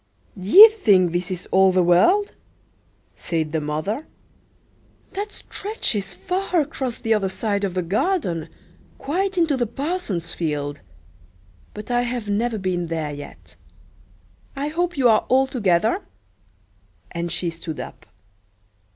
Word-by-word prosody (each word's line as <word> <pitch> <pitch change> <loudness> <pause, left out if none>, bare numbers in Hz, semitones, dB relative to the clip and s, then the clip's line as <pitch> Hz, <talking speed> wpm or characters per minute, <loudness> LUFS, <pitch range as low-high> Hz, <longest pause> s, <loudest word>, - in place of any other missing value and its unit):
"D'ye 210 - +9
think 200 - +3
this 175 0 -2
is 180 -1 -4
all 190 0 +5
the 185 -1 +3
world?" 355 - +3 0.8
said 160 -3 -2
the 160 0 -1
mother. 155 - -3 1.1
"That 410 +2 -4
stretches 210 - -3
far 360 - -1
across 275 -5 -2
the 225 - 0
other 200 -3 0
side 200 +1 -2
of 190 -2 -2
the 185 - 0
garden, 190 - -1 0.5
quite 380 +6 -2
into 325 -4 +2
the 240 -2 0
parson's 270 - -3
field; 145 -3 -3 0.9
but 210 +3 -7
I 245 0 +2
have 240 -2 -3
never 220 +3 0
been 180 -3 -2
there 160 -3 -3
yet. 145 0 -11 1.0
I 280 +2 -2
hope 350 +1 -2
you 260 -3 +4
are 220 -2 +3
all 265 +1 +4
together," 225 - +1 1.1
and 170 0 -3
she 175 -2 -1
stood 165 -1 -7
up. - - -9
205 Hz, 135 wpm, -22 LUFS, 175-285 Hz, 1.1 s, D'ye